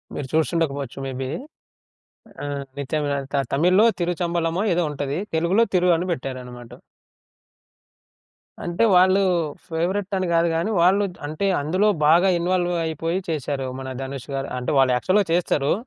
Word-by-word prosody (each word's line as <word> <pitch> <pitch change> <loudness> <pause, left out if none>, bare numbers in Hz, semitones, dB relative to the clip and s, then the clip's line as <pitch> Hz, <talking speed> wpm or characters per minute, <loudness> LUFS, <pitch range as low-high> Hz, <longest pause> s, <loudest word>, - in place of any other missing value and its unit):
మీరు 145 - -4
చూసి 155 -4 +2
ఉండకపోవచ్చు 140 -5 -2
మేబీ. 130 0 -4 1.2
ఆ! - - -3 0.3
'నిత్య 140 +2 -2
మీనన్' 140 -1 -2
త - - +3 0.2
తమిళ్లో 180 +9 +4
'తిరుచంబలమో' 175 +2 -1
ఏదో 175 - +1
ఉంటది. 145 +1 -3 0.2
తెలుగులో 175 +8 +3
'తిరు' 180 -1 +4
అని 180 +2 -3
పెట్టారనమాట. 125 -4 -7 1.9
అంటే 175 +6 +1
వాళ్ళు 185 +2 +5 0.5
ఫేవరెట్ 185 +5 -1
అని 185 - -1
గాదు 170 0 +3
గాని, 165 +6 0
వాళ్ళు 195 +4 +4 0.2
అంటే 155 +6 -2 0.2
అందులో 185 +8 +2 0.2
బాగా 170 +5 +5
ఇన్వాల్వ్ 175 0 0
అయిపోయి 165 +3 -2
చేశారు. 140 -4 -2
మన 130 - -6
'ధనుష్' 135 0 -7
గారు 135 0 -3
అంటే 125 - -2
వాళ్ళు 130 -1 +4
యాక్చువల్‌గా 190 +9 +2
చేస్తారు. 150 -5 +1
165 Hz, 135 wpm, -23 LUFS, 140-180 Hz, 1.9 s, వాళ్ళు